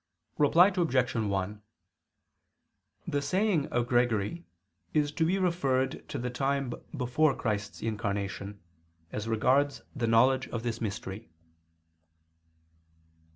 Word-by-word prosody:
Reply 165 +6 +6
Obj. 135 -9 +1
1: 105 -2 -2 1.5
The 145 - 0
saying 180 +1 +1
of 120 -1 0
Gregory 120 - 0 0.5
is 145 -1 +2
to 160 - 0
be 175 +4 +2
referred 140 -8 0
to - - -4
the 125 +1 -3
time 135 0 -1 0.2
before 135 +3 +2
Christ's 105 -2 -3
incarnation, 100 -2 -3 0.5
as 105 +1 -4
regards 135 +6 +2
the 120 -4 -1
knowledge 130 +4 +4
of 115 -1 -4
this 115 -1 -3
mystery. 100 -1 -5
125 Hz, 110 wpm, -29 LUFS, 110-145 Hz, 1.5 s, Reply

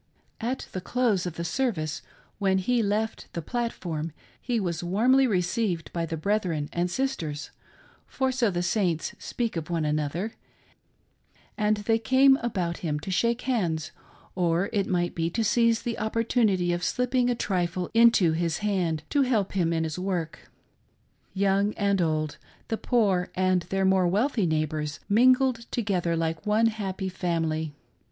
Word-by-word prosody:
At 245 +3 -3
the 185 - -4
close 215 -4 +1
of 170 - -5
the 170 - -4
service, 170 - -1 0.4
when 190 -2 +2
he 235 +6 +1
left 215 +2 -2
the 170 - -3
platform, 170 - -3 0.3
he 240 -2 -1
was 175 -4 -2
warmly 245 +9 +3
received 180 -2 -1
by 170 -1 -2
the 165 - -3
brethren 170 -4 -1
and 175 +1 0
sisters, 165 - -3 0.6
for 265 -1 0
so 250 -3 +1
the 175 -2 -1
Saints 175 -3 0
speak 235 -5 -3
of 165 -1 -4
one 165 -3 0
another, 155 +8 -1 1.2
and 210 0 +1
they 225 +2 +1
came 265 +3 +5
about 185 -9 -2
him 150 -3 -2
to 190 - -5
shake 235 +5 +1
hands, 170 - -1 0.4
or 175 +1 +1
it 200 -2 +1
mfght 175 -1 0
be 165 0 -1
to 225 +6 -1
seize 230 +1 +2
the 235 -1 -3
opportunity 215 -5 +1
of 175 0 -3
slip 250 +5 0
ping 250 -1 +3
a 245 - +1
trifle 180 -4 -1
into 230 -7 +5
his 165 -1 0
hand 175 -6 0
to 285 - +3
help 230 -7 +1
him 175 -4 +1
in 165 -1 0
his 160 +2 -3
work. 180 -4 -3 0.9
Young 200 +1 +2
and 200 -2 +1
old, 155 -2 -1 0.3
the 225 - 0
poor 200 -7 +1
and 185 -1 +2
their 195 0 +1
more 190 -1 +4
wealthy 210 +2 +1
neighbors 155 -1 -1
mingled 255 +2 +4
together 185 -7 0
like 160 -1 -2
one 215 +2 +3
happy 200 -4 -2
family. 165 -4 -2
190 Hz, 160 wpm, -26 LUFS, 170-230 Hz, 1.2 s, came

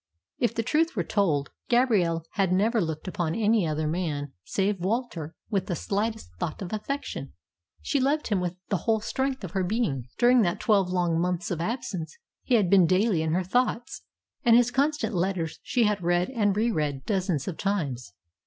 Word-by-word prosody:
If 235 -1 +1
the 230 - 0
truth 315 +6 +1
were 180 - 0
told, 160 -7 0 0.2
Gabrielle 200 -10 +2
had 195 -3 +1
never 215 +5 +2
looked 160 0 -3
upon 175 -4 -2
any 215 -4 +2
other 155 0 -1
man 150 -4 -2
save 195 - 0
Walter 185 - -2 0.2
with 195 -3 0
the 175 - -1
slightest 210 - -2
thought 155 - -3
of 180 - -6
affection. 275 +7 -4 0.5
She 285 - +1
loved 280 +2 +1
him 205 -4 +2
with 180 0 -2
the 200 - +1
whole 220 +5 +1
strength 265 +3 -2
of 185 - -5
her 190 0 0
being. 175 - -1
During 245 0 +5
that 175 -4 0
twelve 200 -4 +3
long 175 -2 +1
months 180 0 -1
of 165 -2 -2
absence 180 - -4 0.2
he 255 - +2
had 210 -5 +3
been 185 -2 +5
daily 185 -1 +2
in 160 0 0
her 185 +2 +1
thoughts, 245 +4 -1 0.4
and 235 -1 +6
his 245 0 +4
constant 275 -4 +1
letters 180 -3 -1
she 245 -1 +1
had 210 -2 +1
read 175 +4 +1
and 205 -5 +1
re 230 +2 +2
read 145 -7 -2
dozens 185 -8 -1
of 180 - -4
times. 140 - -2
195 Hz, 190 wpm, -27 LUFS, 170-230 Hz, 0.5 s, and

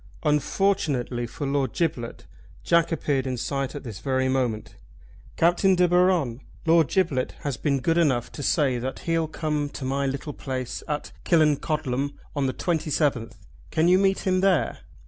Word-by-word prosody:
Unfortunately 150 -6 0
for 130 +6 -6
Lord 135 -3 0
Giblet 130 -9 -2 0.4
Jack 170 0 +3
appeared 140 -4 0
in 130 -1 -2
sight 135 +3 -2
at 145 - -6
this 110 -6 -7
very 130 +2 0
moment. 125 -5 -1 0.6
"Captain 175 +3 +3
De 180 0 +4
Baron, 175 -8 +2 0.2
Lord 165 -2 +5
Giblet 150 -6 0
has 145 -3 -2
been 140 0 0
good 165 +6 +1
enough 130 -8 +1
to - - -7
say 135 -3 +1
that 130 +2 -5
he'll 165 -1 0
come 150 -2 -2
to 140 - -7
my 140 +1 0
little 140 +2 -4
place 130 -3 -4
at 150 -1 -3
Killancodlem 150 -4 +1 0.2
on 140 -2 +1
the 130 - -1
27th. 150 -9 0 0.4
Can 160 +1 +2
you 180 +1 +5
meet 195 0 +2
him 185 -1 +1
there?" 185 -10 +2
145 Hz, 160 wpm, -25 LUFS, 130-165 Hz, 0.6 s, Lord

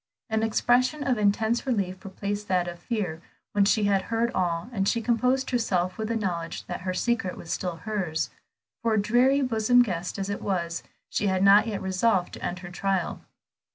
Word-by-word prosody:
An 220 0 +1
expression 245 +6 +2
of 255 -5 +1
intense 220 +5 +1
relief 195 -6 -1
replaced 205 +1 -4
that 180 -2 +1
of 175 0 -6
fear, 180 -6 -3 0.3
when 205 -1 +3
she 210 +1 +3
had 195 -2 +2
heard 230 +1 +1
all, 170 -1 -1
and 195 -3 +1
she 235 - +1
composed 250 +3 +1
herself 185 -7 0
with 220 - -1
the 230 - -1
knowledge 170 -6 -3
that - - -5
her 185 0 -2
secret 225 -3 0
was 165 - -8
still 180 -2 -2
hers. 175 -4 -2 0.5
For, 225 -2 +2
dreary 245 +7 +3
bosom 245 0 +4
guest 180 -5 -3
as 195 -1 -2
it 200 - -4
was, 170 -4 -2 0.3
she 210 - -1
had 190 0 +1
not 200 +3 +7
yet 205 -4 -3
resolved 190 0 +1
to - - -9
end 175 - -2
her 175 - -8
trial. 190 -1 -1
200 Hz, 190 wpm, -26 LUFS, 185-230 Hz, 0.5 s, not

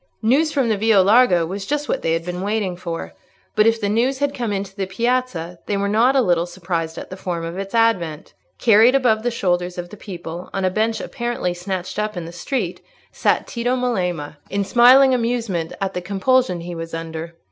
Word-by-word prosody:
News 285 +8 +3
from 275 -4 +1
the 215 - +1
Via 220 0 +4
Larga 195 -3 +5
was 195 +3 -5
just 295 0 -1
what - - -1
they 165 - 0
had 165 0 -2
been 180 0 -4
waiting 200 -2 -1
for. 170 -2 -6 0.4
But 215 0 +5
if 225 0 +3
the 205 - -1
news 240 +6 +1
had 285 +1 0
come 240 -5 -3
into 195 -1 -4
the 195 -2 -3
piazza, 195 -5 -1
they 205 - 0
were 200 0 0
not 230 +6 +3
a 265 - +4
little 175 -3 +1
surprised 170 -2 -4
at - - -8
the - - -5
form 175 -3 -4
of 170 +3 -5
its 195 +2 -5
advent. 185 -9 +1 0.2
Carried 230 +2 +5
above 245 -5 +3
the 245 - 0
shoulders 180 -5 -1
of 175 0 -5
the 210 - -10
people, 175 -3 -8
on 195 -1 -1
a 185 - +2
bench 220 +2 0
apparently 240 -8 -3
snatched 185 +2 -4
up 210 -2 -2
in 170 - -4
the 165 - -8
street, 180 +1 -3 0.3
sat - - +1
Tito 245 +1 -1
Melema, 180 -12 -2
in 200 +1 0
smiling 255 +5 +6
amusement 230 -9 -1
at 195 -1 -2
the 180 - -3
compulsion 195 0 +1
he 175 +1 -6
was 165 0 -6
under. 165 0 -6
195 Hz, 210 wpm, -21 LUFS, 175-235 Hz, 0.4 s, smiling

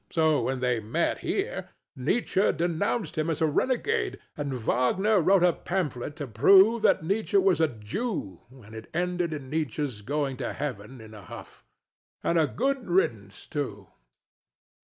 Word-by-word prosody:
So 160 -3 +2
when 130 -1 -2
they 125 -2 +1
met 110 0 -1
here, - - -3 0.3
Nietzsche 190 - +1
denounced 175 +3 -1
him 155 +2 0
as 160 - -1
a 160 - +3
renegade; 385 - 0 0.2
and 145 -2 -3
Wagner 180 - +2
wrote 190 +2 +4
a 180 -1 +5
pamphlet 150 -7 -3
to 150 -2 -5
prove 190 - +5
that - - +3
Nietzsche 210 - 0
was 390 - +3
a 160 - +5
Jew; 115 - -4
and 120 -5 -15
it 110 0 -9
ended 175 -1 0
in 140 -4 -6
Nietzsche's 145 -7 -2
going 140 +2 -2
to 125 -3 -3
heaven 125 -4 -6
in 110 0 -12
a 105 - -10
huff. 90 - -11 0.6
And 170 - +2
a 155 - +3
good 265 - -1
riddance 110 - -1
too. 105 -10 -5
150 Hz, 160 wpm, -27 LUFS, 125-190 Hz, 0.6 s, a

